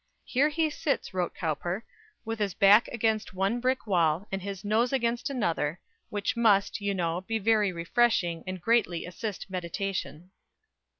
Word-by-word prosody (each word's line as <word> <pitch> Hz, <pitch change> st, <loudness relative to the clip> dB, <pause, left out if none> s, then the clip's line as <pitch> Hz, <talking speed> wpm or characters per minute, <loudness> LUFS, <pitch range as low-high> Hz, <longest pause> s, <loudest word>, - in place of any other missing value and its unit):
"Here 275 Hz, +4 st, +2 dB
he 310 Hz, 0 st, 0 dB
sits," 290 Hz, -7 st, -2 dB
wrote 180 Hz, -2 st, -2 dB
Cowper, 175 Hz, +5 st, -3 dB, 0.4 s
"with 225 Hz, 0 st, -4 dB
his 200 Hz, -3 st, -1 dB
back 205 Hz, +4 st, +6 dB
against 220 Hz, -4 st, -1 dB
one 195 Hz, +6 st, 0 dB
brick 255 Hz, +2 st, 0 dB
wall, 175 Hz, -1 st, +1 dB
and 195 Hz, 0 st, -2 dB
his 195 Hz, 0 st, -6 dB
nose 225 Hz, +4 st, +2 dB
against 240 Hz, -1 st, 0 dB
another, 170 Hz, -, -1 dB, 0.3 s
which 205 Hz, -1 st, -2 dB
must, 210 Hz, -4 st, +3 dB
you 200 Hz, -1 st, -1 dB
know, 170 Hz, -1 st, -1 dB
be 225 Hz, +4 st, -2 dB
very 215 Hz, -2 st, +2 dB
refreshing, 175 Hz, -1 st, +1 dB
and 185 Hz, 0 st, -4 dB
greatly 190 Hz, -4 st, +1 dB
assist 195 Hz, +3 st, -5 dB
meditation." 180 Hz, -2 st, -4 dB
200 Hz, 155 wpm, -28 LUFS, 180-230 Hz, 0.4 s, back